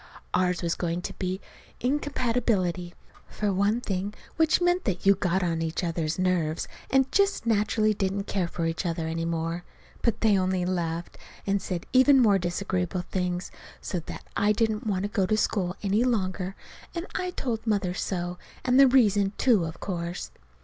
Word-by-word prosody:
Ours 180 -1 +1
was 170 -1 +1
going 175 0 -2
to - - -4
be 185 0 -2 0.4
incompatibility, 230 -10 0 0.3
for 210 -2 -1
one 205 +5 +2
thing, 200 -1 -3 0.2
which 320 -1 +3
meant 355 +1 +2
that 190 -3 -2
you 200 - +8
got 185 -1 0
on 165 -2 0
each 165 +2 -2
other's 165 -2 -1
nerves, 180 -4 0 0.2
and 265 0 +3
just 400 - +2
naturally 215 -1 +2
didn't 195 0 -1
care 190 -3 -1
for 170 0 -3
each 165 +2 -1
other 165 -2 -2
any 165 +1 -2
more. 165 +1 -2 0.4
But 235 - 0
they 210 -3 +4
only 185 -1 0
laughed, 170 -2 -2 0.3
and 200 0 +1
said 175 -2 -4
even 265 +2 +7
more 205 -5 +5
disagreeable 180 0 -1
things, 180 -1 -2 0.3
so 180 - -3
that 165 - -8
I 210 +1 +3
didn't 220 0 0
want 190 -2 0
to - - 0
go 200 -3 0
to 215 - +2
school 190 -4 0
any 205 +4 +2
longer, 190 -5 -1 0.4
and 340 +1 -3
I 365 -1 -1
told 240 -9 -3
Mother 200 -4 +1
so, 175 -1 -3 0.3
and 255 +1 +4
the 275 - +9
reason, 205 -6 +4
too, 225 -10 +4
of 160 +1 -7
course. 175 -2 -4
190 Hz, 175 wpm, -27 LUFS, 175-220 Hz, 0.4 s, the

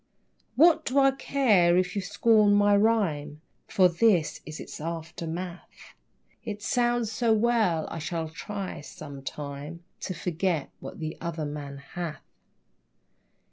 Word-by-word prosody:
What 325 +2 +5
do 270 - -2
I 270 -1 +6
care 220 -11 +3
if 180 0 0
you 200 - 0
scorn 205 +2 +4
my 205 0 +5
rime? 180 -9 +1 0.3
For 190 -4 +5
this 175 -1 +2
is 155 0 -7
its - - -8
aftermath; 170 +2 -6 0.5
It 210 -2 -6
sounds 240 -2 +1
so 230 0 +2
well 215 -8 +2
I 165 - -6
shall 165 +1 -3
try, 195 +4 -6
(sometime,) 145 0 -8 0.2
To 185 - -4
"forget 170 -2 -1
what - - -9
the 155 0 -5
other 165 -2 -3
man 145 -1 -6
hath!" 155 +3 -6
180 Hz, 130 wpm, -27 LUFS, 160-215 Hz, 0.5 s, I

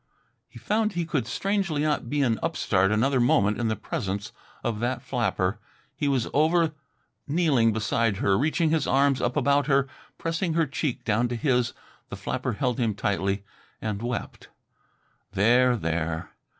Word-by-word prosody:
He - - -14
found 215 0 0
he 170 -1 -1
could 140 -8 -1
strangely 190 - -1
not 150 -6 0
be 145 +1 +1
an 115 -4 +1
upstart 100 - +1
another 130 +5 +2
moment 105 -3 +3
in 120 - 0
the 110 - 0
presence 100 +1 -4 0.3
of 110 -3 -2
that 120 +3 -2
flapper. 115 -5 -1 0.4
He 145 - -1
was 130 -5 +1
over 160 +1 +3 0.5
kneeling 145 -7 +3
beside 110 0 0
her, 95 -1 +2
reaching 155 - +1
his 160 -1 +1
arms 135 0 +3
up 125 +1 -1
about 140 0 +2
her, 135 -1 +3 0.3
pressing 165 +1 -1
her 165 -1 +3
cheek 140 -1 -3
down 115 +3 +1
to 120 - -3
his. 125 0 +1 0.4
The - - -6
flapper - - -3
held 125 +3 -1
him 115 -4 0
tightly 100 0 -1 0.4
and 105 -2 -3
wept. 120 +1 -5 0.9
"There, 120 +5 +4
there!" 80 -2 -2
125 Hz, 160 wpm, -26 LUFS, 110-150 Hz, 0.9 s, There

